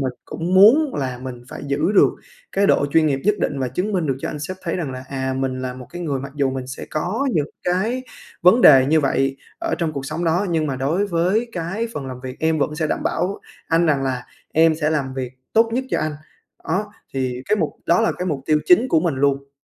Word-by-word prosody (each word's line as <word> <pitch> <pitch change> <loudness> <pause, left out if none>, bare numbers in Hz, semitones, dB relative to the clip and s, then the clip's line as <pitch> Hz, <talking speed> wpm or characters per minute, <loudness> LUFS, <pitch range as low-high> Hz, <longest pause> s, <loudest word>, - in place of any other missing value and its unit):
mình 130 -2 -1
cũng 170 +3 -3
muốn 255 +10 +6
là 130 -3 -3
mình 125 -2 -7
phải - - -8
giữ 140 +7 0
được 205 - +6 0.4
cái 200 +1 +2
độ 145 - +3
chuyên 155 +2 +3
nghiệp 135 -2 0
nhất 210 - +4
định 145 -5 -1
và 130 -2 -1
chứng 185 - -2
minh 180 -5 0
được 135 - 0
cho - - -4
anh 150 - -5
sếp 185 +6 -5
thấy 170 - -2
rằng 165 -7 -3
là, 130 0 -7
à, 130 -1 -2
mình 130 -1 -2
là 125 0 -4
một 125 -1 -10
cái 175 0 -6
người 140 -5 -2
mặc 140 +1 -7
dù 140 -2 +1
mình 130 -1 -4
sẽ 130 - -7
có 190 - -1
những 150 -6 +1 0.2
cái 215 +8 0 0.4
vấn 180 +8 +6
đề 135 - +8
như 155 +2 +4
vậy 135 -1 +1 0.2
ở 335 -1 -1
trong 165 -2 -1
cuộc 140 -2 -5
sống 160 +4 -3
đó, 175 +5 +1
nhưng 160 -2 +1
mà 135 -3 -2
đối 160 +10 0
với 190 +6 +1
cái 190 +6 -3
phần 135 -2 -4
làm 125 -1 -7
việc 130 0 -7
em 160 0 +1
vẫn 150 +1 0
sẽ 155 -1 -1
đảm - - -2
bảo 180 +4 -1 0.3
anh 165 +1 +3
rằng 140 -3 +2
là 130 -2 -2 0.3
em 160 0 +4
sẽ 155 -1 0
làm 135 -4 -1
việc 130 -2 -4 0.2
tốt 225 +1 +4
nhất 255 +3 0
cho - - +1
anh. 155 0 -1 0.6
Đó, 205 +2 -1 0.2
thì 130 -1 -2
cái 210 - +3
mục 160 -6 0 0.2
đó 170 - +4
là 225 - +2
cái 180 - -2
mục 150 -6 -1
tiêu 155 -1 +3
chính 350 -8 +5
của 160 - +3
mình 165 -3 0
luôn. 140 0 0
155 Hz, 255 wpm, -21 LUFS, 135-180 Hz, 0.6 s, đề